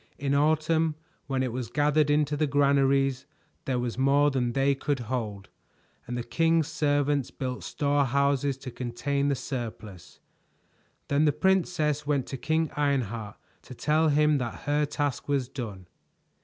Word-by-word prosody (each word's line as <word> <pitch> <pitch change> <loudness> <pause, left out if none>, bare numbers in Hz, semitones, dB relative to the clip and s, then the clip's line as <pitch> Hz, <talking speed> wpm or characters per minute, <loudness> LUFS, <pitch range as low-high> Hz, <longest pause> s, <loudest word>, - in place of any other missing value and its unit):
In 140 -1 -1
autumn, 155 +2 +2 0.3
when 135 -1 0
it 130 - -2
was 125 -3 -4
gathered 150 +2 +2
into 150 0 +2
the 150 +1 +1
granaries, 135 -1 +2 0.4
there 130 -2 0
was 120 0 -3
more 140 +2 +4
than 125 -3 -1
they 135 +1 +2
could 140 -1 -2
hold, 110 -5 -4 0.6
and 120 +1 -3
the 120 - -3
king's 165 +4 +2
servants 145 -3 +1
built 125 -1 -5
storehouses 140 -1 +1
to 135 -1 -8
contain 130 +4 -2
the 140 - +1
surplus. 105 - -7 0.9
Then 145 +2 +2
the 150 - +4
princess 160 -4 +1
went 140 -3 +1
to 135 - -4
King 160 +3 0
Ironheart 120 -7 -1 0.2
to 125 - -11
tell 155 +4 +2
him 150 0 +3
that 120 -3 -5
her 145 0 +1
task 145 -2 -3
was 140 -3 +1
done. 110 -8 -7
140 Hz, 150 wpm, -27 LUFS, 125-150 Hz, 0.9 s, more